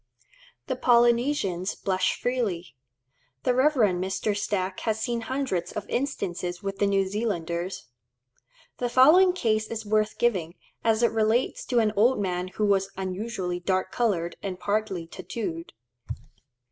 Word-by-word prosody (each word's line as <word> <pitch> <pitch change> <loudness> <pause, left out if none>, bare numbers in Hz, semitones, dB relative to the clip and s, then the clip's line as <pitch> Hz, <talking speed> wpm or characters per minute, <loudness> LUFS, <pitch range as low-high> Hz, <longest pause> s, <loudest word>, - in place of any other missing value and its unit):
The 260 - -2
Polynesians 235 -6 +2
blush 185 -1 0
freely. 205 - -2 0.7
The 250 - +2
Rev. 270 +5 +4
Mr. 195 -2 +1
Stack 195 -2 -2
has 220 -1 -1
seen 235 +1 -2
hundreds 225 -8 -2
of 210 - -5
instances 180 -9 -3
with 195 0 -4
the 205 - +3
New 195 -1 +2
Zealanders. 185 - -3 0.9
The 245 - -1
following 315 +10 +6
case 220 -11 0
is 225 -1 -5
worth 215 0 +1
giving, 185 -8 0 0.3
as 225 0 +2
it 235 - +4
relates 225 +2 +1
to 250 - -1
an 220 -2 +3
old 235 +6 +4
man 180 -2 -2
who 190 +3 -2
was 195 -1 +2
unusually 190 -1 -3
dark 185 +1 -1
coloured 180 -8 0
and 185 -2 -5
partly 200 -4 -1
tattooed. 170 -1 -6
205 Hz, 135 wpm, -26 LUFS, 185-235 Hz, 0.9 s, following